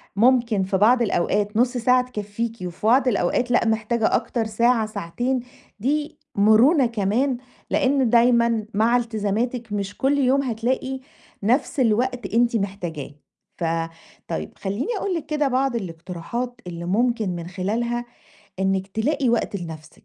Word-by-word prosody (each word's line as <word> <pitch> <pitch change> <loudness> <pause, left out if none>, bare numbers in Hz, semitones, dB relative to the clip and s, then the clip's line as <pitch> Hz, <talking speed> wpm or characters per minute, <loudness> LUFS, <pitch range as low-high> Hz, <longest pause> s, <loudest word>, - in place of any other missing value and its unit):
ممكن 230 -2 +3
في 190 +1 0
بعض 240 +5 +5
الأوقات 205 0 0
نُص 245 +2 +3
ساعة 250 +1 +3
تكفّيكِ، 225 +1 -4
وفي 180 +3 -4
بعض 255 +3 +4
الأوقات 245 +2 +1
لأ، 245 - +3
محتاجة 220 +1 +1
أكتر 230 -2 -1
ساعة 230 +1 +2
ساعتين، 240 +6 -2 0.4
دي 295 +6 -1 0.2
مرونة 230 +8 +5
كمان، 235 +4 0 0.3
لإن 265 -2 +2
دايمًا 235 -2 +3
مع 225 +4 +3
إلتزاماتِك 230 0 -2
مش 200 0 -3
كل 275 +2 +2
يوم 275 0 +3
هتلاقي 260 +2 -2 0.4
نَفْس 250 +7 +1
الوقت 245 -2 +1
أنتِ 235 +1 +3
محتاجاه. 180 -9 -3 0.5
ف - - -5 0.6
طيب 80 0 -4
خليني 200 - -3
أقول 395 -1 -2
لِك 330 - -4
كده 300 -1 0
بعض 265 -1 +1
الاقتراحات 190 +6 -5
اللي 170 -1 -6
ممكن 225 +2 +1
من 170 -1 -6
خلالها 230 +6 -2 0.5
إنِك 190 0 0
تلاقي 245 +7 0
وقت 230 -3 0
لنَفْسِك. 160 -4 -9
230 Hz, 140 wpm, -23 LUFS, 200-250 Hz, 0.6 s, بعض